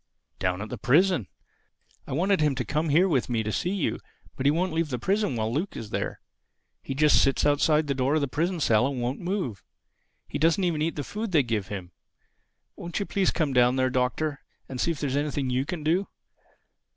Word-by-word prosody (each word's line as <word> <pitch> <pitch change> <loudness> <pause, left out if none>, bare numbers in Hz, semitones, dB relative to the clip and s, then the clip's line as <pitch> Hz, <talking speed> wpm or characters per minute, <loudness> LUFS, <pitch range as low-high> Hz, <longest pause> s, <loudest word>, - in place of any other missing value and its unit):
"Down 90 +1 -1
at 110 - -8
the 125 - -6
prison. 160 - +3 0.8
I - - -4
wanted 185 +5 +2
him 150 -3 +2
to 125 -2 -2
come 155 +8 -1
with 155 -4 +3
me 120 - 0
here 110 - +1
to 110 - -2
see 175 - -1
you; 195 -2 -1 0.4
but 135 - 0
he - - +6
won't 175 +2 0
leave 165 -1 0
the 125 - -2
prison 195 - 0
while 110 0 -1
Luke 170 +9 -2
is 110 -2 -7
there. - - -3 0.6
He 135 - -5
just 150 +1 +5
sits 135 +1 +2
outside 150 +1 +3
the 140 - 0
door 135 +2 +1
of 155 - +2
the 140 - 0
prison 170 +6 -1
cell 115 -4 +3
and 135 -2 -3
won't 120 +3 -2
move. 175 - -3 0.6
He - - -4
doesn't 165 +5 +3
even 165 -4 0
eat 165 +2 0
the 145 - -3
food 215 - -5
they 155 -5 +4
give 110 -5 -2
him. 95 -3 -6 0.8
Won't 175 +3 -5
you 200 - -1
please 195 -2 +1
come 150 -5 0
down 125 0 +4
there, 130 -1 +1
Doctor, 130 +4 -1 0.3
and 130 -2 -4
see - - +1
if 165 - -2
there 145 - -1
is - - -1
anything 145 -2 -1
you 130 +2 0
can 170 -3 -4
do? 175 +6 +1
145 Hz, 225 wpm, -26 LUFS, 125-170 Hz, 0.8 s, he